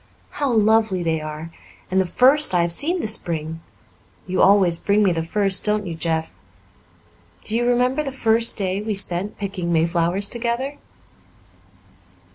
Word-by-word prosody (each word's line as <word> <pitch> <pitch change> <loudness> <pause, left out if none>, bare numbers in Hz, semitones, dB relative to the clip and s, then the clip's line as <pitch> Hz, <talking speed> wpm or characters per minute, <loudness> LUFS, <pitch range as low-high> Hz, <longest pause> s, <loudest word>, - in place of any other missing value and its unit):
"How 285 -3 -2
lovely 220 -4 +2
they 160 -2 -1
are! 155 +2 -8 0.4
And 190 0 +2
the 185 - -3
first 265 - +3
I 175 - +3
have 170 0 0
seen 340 - +4
this 215 - +2
spring. 160 -3 -4 0.6
You 185 0 -2
always 190 -4 +4
bring 205 +1 +1
me 195 - +2
the 165 -1 -2
first, 195 +3 +1
don't 210 -1 -1
you, 170 - -5
Jeff? 160 0 -3 1.1
Do 215 - -4
you 240 +1 0
remember 250 +4 +1
the 275 -2 -5
first 230 -3 +2
day 195 0 -2
we 215 0 -3
spent 195 +1 0
picking 190 -4 -5
mayflowers 170 +4 0
together?" 240 +5 -3
200 Hz, 155 wpm, -20 LUFS, 170-230 Hz, 1.1 s, seen